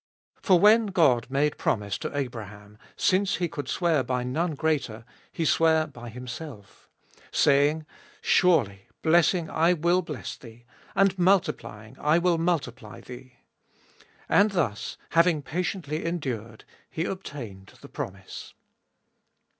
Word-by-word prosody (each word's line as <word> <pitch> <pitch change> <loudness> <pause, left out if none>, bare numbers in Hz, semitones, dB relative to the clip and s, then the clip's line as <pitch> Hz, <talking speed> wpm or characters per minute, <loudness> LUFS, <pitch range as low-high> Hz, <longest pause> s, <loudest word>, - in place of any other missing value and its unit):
For 185 -3 +4
when 215 +3 +6
God 150 - +3
made 145 +2 0
promise 100 -2 -1
to 145 - -5
Abraham, 105 -5 -6 0.2
since 195 +1 +2
he 175 - -1
could 145 -4 -6
sware 170 -5 +1
by 125 0 -2
none 155 +6 -1
greater, 140 -8 -1 0.3
he 165 - -2
sware 160 0 +3
by 120 -5 -10
himself, 125 - -9 0.4
14. - - -24
Saying, 145 +2 +3 0.3
Surely 120 - +2 0.2
blessing 170 +1 +3
I 165 +3 +2
will 175 +2 +2
bless 150 - -6
thee, 120 -1 -15 0.3
and 195 -1 +3
multiplying 115 - 0
I 150 +2 +3
will 175 -1 +2
multiply 130 - -2
thee. 125 +1 -11 0.7
15. - - -25 0.2
And 205 +2 +4
thus, 140 - -2
having 170 -3 +3
patiently 170 -1 -3
endured,1 125 -10 -4 0.3
he 165 - -3
obtained, 120 - -7
the - - -11
promise. 95 0 -8
150 Hz, 130 wpm, -26 LUFS, 120-170 Hz, 0.7 s, when